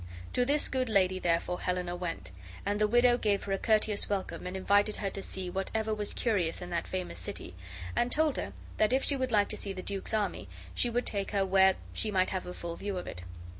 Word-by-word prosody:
To 245 - +3
this 290 +3 +3
good 255 -2 -1
lady, 185 -3 +3
therefore, 175 0 0
Helena 180 -1 -1
went, 165 - -4 0.3
and 205 +1 0
the 210 - +5
widow 240 +2 +5
gave 205 -2 +1
her 200 - -5
a 195 - 0
courteous 215 -2 +2
welcome 195 -2 -2
and 185 +1 -4
invited 205 +2 +3
her 195 -2 -2
to 195 - -5
see 190 -1 -4
whatever 215 +4 -1
was 210 -1 -2
curious 190 -8 +1
in 180 0 -7
that 170 -1 -1
famous 185 -1 -4
city, 200 - -6 0.4
and 240 - +1
told 305 0 +3
her 100 - -4 0.2
that 215 +3 +3
if 265 - +2
she 285 - +3
would 260 -2 -1
like 205 -2 +3
to - - -2
see 200 - -2
the 185 -1 -6
duke's 200 +2 -1
army 210 -2 -1 0.2
she 245 - +1
would 240 +1 0
take 200 -2 -1
her 200 -2 +1
where 190 0 +5 0.2
she 220 - +1
might 185 -2 +2
have 185 -2 -3
a 180 - -5
full 170 -1 -5
view 200 +1 -4
of 180 - -4
it. 90 - -6
200 Hz, 235 wpm, -31 LUFS, 185-220 Hz, 0.4 s, the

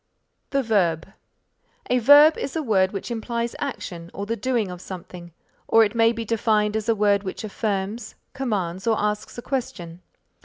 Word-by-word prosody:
THE 275 -1 0
VERB 180 -7 +1 0.8
A 250 - +4
verb 290 +6 +7
is 275 - -5
a 320 - -1
word 190 -6 +2
which 200 +4 -5
implies 235 +1 -3
action 175 -11 -5
or 200 - -4
the 225 +2 -2
doing 230 -3 -1
of 180 0 -8
something, 180 -2 -9 0.4
or 225 - +6
it 205 - -4
may 230 -1 +4
be 230 -1 -5
defined 215 -1 +1
as 220 +1 -2
a 225 - +4
word 205 -1 +3
which 195 +1 -6
affirms, 210 +1 -3 0.2
commands 200 -8 -3
or 220 -1 +3
asks 210 +2 -2
a 240 - -6
question. 180 -10 -4
215 Hz, 170 wpm, -23 LUFS, 190-235 Hz, 0.8 s, verb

